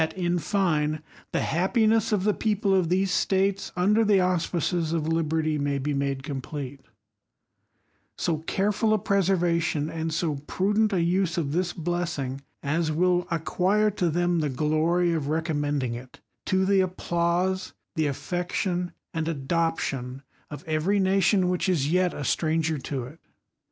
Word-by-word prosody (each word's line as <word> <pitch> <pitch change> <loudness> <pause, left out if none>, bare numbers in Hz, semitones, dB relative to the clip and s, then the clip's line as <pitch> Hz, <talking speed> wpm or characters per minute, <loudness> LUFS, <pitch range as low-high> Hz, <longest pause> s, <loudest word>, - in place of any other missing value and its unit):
in 175 -1 0
fine, 155 -4 0 0.3
the - - 0
happiness 220 +5 +2
of 205 -3 +1
the 210 +1 +3
people 205 -2 0
of 185 -4 +2
these 190 +1 +1
States, 195 +1 +1
:erthe 205 +2 +4
auspices 175 -2 0
of 160 -2 -1
liberty, 160 -1 0
may 140 0 0
be 145 +2 -2
made 140 -1 -1
complete, 140 -1 -6 1.4
so 160 -3 0
careful 210 +6 +1
a - - +2
preservation 175 -5 +1
and 160 0 -3
so 160 -2 -1
prudent 210 +3 +1
a 180 -4 +1
use 175 0 +1
of 150 -5 -1
this 175 +2 0
,unjssing, 165 -6 -2 0.2
as 155 +3 0
will 180 +2 +2
acquire 185 +6 +1
to 180 -4 0
them 175 +1 +1
the 150 -2 0
glory 160 +5 +1
of 155 -4 -1
recom 160 +1 -1
imendrngit 130 -4 -3 0.3
to 190 0 +2
the 195 0 +3
applause, 180 0 0 0.2
the 155 -2 +1
affection, 175 +4 -2 0.2
and 160 -1 -2
adoption 140 -4 -2 0.3
^very 160 +5 0
nation 190 0 +3
which 180 +1 0
is 150 -5 +1
yet 180 0 +3
a 145 - -6
stranger 160 +1 0
to 130 -1 -4
it. 145 +7 -11
170 Hz, 140 wpm, -26 LUFS, 155-185 Hz, 1.4 s, erthe